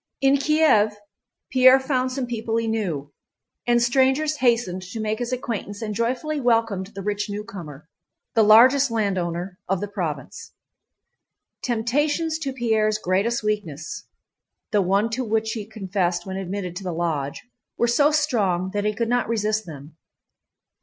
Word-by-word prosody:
In 275 +1 +4
Kiev 280 -8 +3 0.6
Pierre 260 0 +7
found 260 -1 -1
some 260 0 -2
people 230 -1 -2
he 230 - 0
knew, 175 -11 -2 0.5
and 240 0 +4
strangers 265 +5 +2
hastened 235 -8 +1
to 185 +5 -7
make 215 0 -2
his 245 0 -3
acquaintance 225 -5 -4
and 215 -1 -3
joyfully 255 +7 -1
welcomed 225 -6 +1
the 195 - -6
rich 205 +1 -2
newcomer, 190 -9 -7 0.5
the 225 - +4
largest 250 +6 +6
landowner 185 -4 -2
of 195 -1 +1
the 205 - -3
province. 170 -9 -5 1.1
Temptations 295 +7 0
to 280 -4 -3
Pierre's 220 -4 +1
greatest 215 +5 0
weakness—the 205 +1 -4
one 200 +5 +1
to 255 +3 -1
which 220 -1 0
he 215 -3 -4
had 220 - -24
confessed 185 -4 -1
when 190 -1 -5
admitted 190 -1 -4
to 195 - -7
the 180 - -3
Lodge—were 165 - -3
so 285 +5 +4
strong 210 - +1
that 205 +1 -2
he 210 0 0
could 230 +1 -1
not 245 -1 0
resist 215 -2 0
them. 150 0 -11
215 Hz, 145 wpm, -23 LUFS, 190-245 Hz, 1.1 s, Pierre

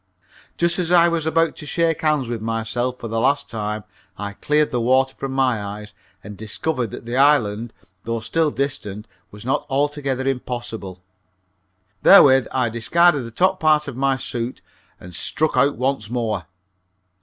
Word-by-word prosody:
Just 170 +1 +1
as 175 -1 -1
I 170 -1 +6
was 165 -2 -1
about 165 +1 +2
to 150 - -9
shake 165 +1 0
hands 150 -5 +1
with 115 -2 -4
myself 115 +3 -2
for 115 - -6
the 115 0 -2
last 140 +4 +1
time 105 -1 -4 0.3
I 100 0 -5
cleared 150 +7 +1
the 120 - 0
water 130 +2 +2
from 135 - -5
my 130 -4 +1
eyes 105 +1 -8 0.3
and 105 0 -9
discovered 115 +4 -3
that 110 - -9
the 120 +2 -3
island 120 -6 +3 0.3
though 115 0 -2
still 155 +8 0
distant 120 -8 -4 0.2
was 105 +2 -12
not 130 - 0
altogether 140 -1 -1
impossible. 120 -8 -4 1.0
Therewith 135 -9 +7
I 125 -3 0
discarded 145 +5 +2
the - - -7
top 185 +10 +1
part 155 -1 +3
of 140 - -6
my 135 +1 +1
suit 120 -1 -5 0.4
and 90 0 -12
struck 155 - 0
out 140 +3 +3
once 130 -4 -1
more. 110 -8 -2
130 Hz, 165 wpm, -21 LUFS, 115-150 Hz, 1.0 s, Therewith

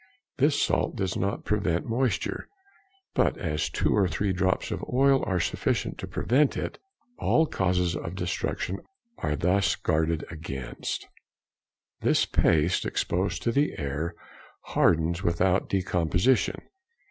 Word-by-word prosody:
This 145 +2 +3
salt - - +1
does 95 -1 -1
not 100 +1 -2
prevent 95 -5 0
moisture, 115 -3 -1 0.7
but - - +2
as 80 -4 -1
two - - +1
or 100 -2 +3
|169| - - -5
three 100 +1 0
drops 95 0 0
of - - -3
oil 135 +1 +4
are 95 -3 +1
sufficient - - -1
to - - -5
prevent 135 +4 +2
it, - - -4 0.4
all 160 - +3
causes 90 - 0
of 85 +1 -5
destruction 90 +1 -2 0.4
are 75 - -1
thus 90 +6 +2
guarded 80 0 0
against. 75 -5 -5 0.9
This - - +3
paste 85 +3 +2
exposed 95 +3 -1
to 120 - +1
the 145 +5 +1
air 75 +4 -3 0.6
hardens 85 +1 +3
without 90 +1 +1
decomposition. 90 +4 +1
90 Hz, 130 wpm, -27 LUFS, 85-105 Hz, 0.9 s, oil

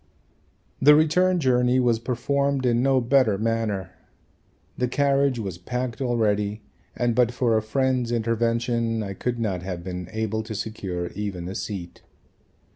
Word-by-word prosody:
The 150 +2 +8
return 180 +4 +3
journey 125 -2 +3
was 120 -3 +2
performed 135 +3 0
in 120 -1 +2
no 135 0 +3
better 125 -4 +3
manner. 110 -3 -1 0.8
The 125 - 0
carriage 140 0 +2
was 95 -6 -5
packed 125 +5 -4
already 105 -4 0 0.3
and 120 -1 +1
but 120 0 +3
for 120 -2 +1
a 110 - +2
friend's 125 +1 0
intervention 115 0 0
I 100 -1 -5
could 120 +5 -3
not 100 -6 -2
have 90 -2 -5
been 90 -1 -6
able 110 0 -2
to 110 0 -7
secure 95 -4 -4
even 95 -4 -5
a 95 - -5
seat. 90 -2 -6
115 Hz, 145 wpm, -24 LUFS, 105-125 Hz, 0.8 s, The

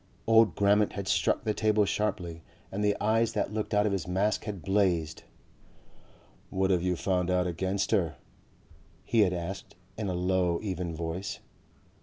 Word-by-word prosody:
Old 115 -1 +5
Grammont 100 +1 +3
had 100 -1 -5
struck 85 +2 +1
the 110 -1 0
table 105 -1 +2
sharply 90 -6 -2 0.3
and 100 +2 -2
the 105 0 +2
eyes 115 +2 +2
that 105 -1 -1
looked 110 -1 -3
out 105 0 +3
of 105 - +1
his 95 -4 -2
mask 100 +5 0
had 100 -5 -5
blazed. 95 -6 +1 1.3
"What 95 0 +1
have 90 -2 +2
you 90 0 0
found 90 0 0
out 90 0 +2
against 95 +3 -1
her?" 85 -6 +1 0.9
he 115 - +1
had 100 -4 +5
asked 90 +2 -5 0.2
in 105 - -2
a 90 - -2
low 90 -1 +1
even 90 -4 -3
voice. 85 +4 -4
95 Hz, 165 wpm, -29 LUFS, 90-105 Hz, 1.3 s, Old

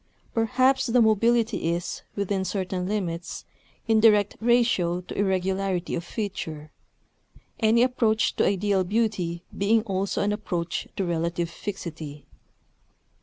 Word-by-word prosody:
Perhaps 255 +4 +2
the 245 +1 +3
mobility 225 -3 +3
is, 175 +1 -5
within 200 -1 -1
certain 185 -2 -2
limits, 175 -5 -3 0.4
in 220 -1 +4
direct 210 -2 +4
ratio 225 -7 +2
to 180 - -9
irregularity 190 -1 0
of 170 - -2
feature; 165 -7 -5 0.9
any 230 +1 +4
approach 230 -4 +1
to - - +3
ideal 200 -1 +1
beauty 185 -4 -1
being 215 +2 +2
also 195 -2 -1
an 205 +1 +1
approach 175 -5 -3
to 195 - -1
relative 170 0 -1
fixity. 160 -7 -7
195 Hz, 120 wpm, -25 LUFS, 175-220 Hz, 0.9 s, in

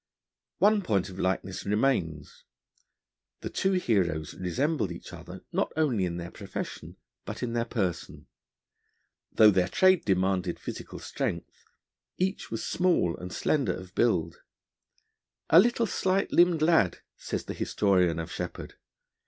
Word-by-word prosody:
One 210 0 +4
point 100 - 0
of 95 0 -10
likeness 95 0 -2
remains. 100 - -1 1.0
The - - -5
two 190 0 +1
heroes 90 - 0
resembled 100 - -1
each 85 - -9
other - - -10
not - - 0
only 125 -12 +2
in 85 -1 -3
their 85 0 -6
profession, - - -7 0.3
but - - -6
in 115 -1 -2
their 115 -1 0
person. 95 -8 -3 1.1
Though 110 -1 +7
their 95 -2 +2
trade 185 - +4
demanded 95 -1 0
physical - - -7
strength, - - -5 0.5
each 190 +2 -2
was 115 - -4
small 175 - +1
and 90 0 -8
slender 130 - 0
of 95 0 -10
build. 85 -9 +1 1.1
'A 165 - +9
little, 235 +3 +3
slight 190 -1 0
limbed 175 -3 +4
lad,' 155 - +3
says - - -5
the - - -5
historian 90 -5 +1
of 85 +1 -5
Sheppard. 90 -1 -6
100 Hz, 135 wpm, -28 LUFS, -, 1.1 s, A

